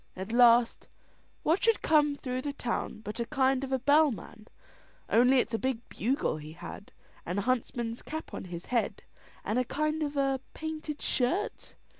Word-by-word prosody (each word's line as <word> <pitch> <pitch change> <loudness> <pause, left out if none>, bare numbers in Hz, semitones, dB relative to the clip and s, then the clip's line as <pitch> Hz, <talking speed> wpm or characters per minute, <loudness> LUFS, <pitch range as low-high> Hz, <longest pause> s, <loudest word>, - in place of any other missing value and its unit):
At 190 +3 -6
last, 240 -1 +5 0.6
what 330 +5 +2
should 455 -2 +3
come 295 -2 +4
through 255 -2 -3
the 285 +1 -3
town 235 -4 -3
but 210 +2 -6
a 235 - 0
kind 265 +1 +2
of 270 - -4
a 265 - +3
bellman, 270 -5 +1 0.6
only 250 +3 +5
it's 245 - +1
a 225 - 0
big 260 -3 -2
bugle 250 - 0
he 155 0 -9
had, 200 - -9 0.3
and 175 +3 -3
a 200 - 0
huntsman's 240 -1 -1
cap 315 +1 -7
on - - -5
his 175 -1 -7
head, 240 -2 -1 0.4
and 225 - +1
a - - +2
kind 305 +5 -1
of 290 -1 -2
a 270 -1 +1 0.2
painted 310 -1 -5
shirt. 265 +11 -1
255 Hz, 175 wpm, -30 LUFS, 230-290 Hz, 0.6 s, last